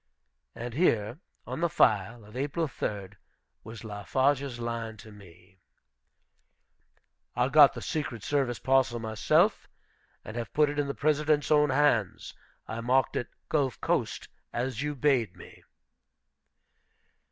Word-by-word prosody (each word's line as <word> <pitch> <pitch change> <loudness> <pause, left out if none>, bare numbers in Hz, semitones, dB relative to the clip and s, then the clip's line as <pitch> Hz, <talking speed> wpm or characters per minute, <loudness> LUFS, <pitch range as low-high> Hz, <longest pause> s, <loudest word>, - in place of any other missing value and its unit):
And 120 0 -6
here, 120 - +1 0.3
on - - -5
the 170 - +2
file 110 -3 +2
of 105 +2 -15
April 145 +5 -1
3d, 100 -7 -5 0.5
was 110 0 -9
Fafarge's 130 +5 -1
line 115 -1 -4
to 110 +1 -13
me: 95 -2 -17 1.8
"I 125 +2 +1
got 145 -1 +7
the - - -6
secret 130 -8 -4
service 135 -4 0
parcel 130 -2 +2
myself, 110 -2 +1 0.6
and 110 - -8
have 120 -1 -4
put 150 -1 +3
it 145 - -4
in 145 - 0
the 140 - -4
President's 150 0 +1
own 150 -1 +5
hands. 130 -8 +1 0.3
I 115 - -5
marked 130 +2 +1
it, 120 - -2 0.2
'Gulf 140 -5 0
coast,' - - -1 0.2
as 125 0 -3
you 150 0 -2
bade 130 -8 +1
me." - - -14
125 Hz, 130 wpm, -28 LUFS, 110-145 Hz, 1.8 s, got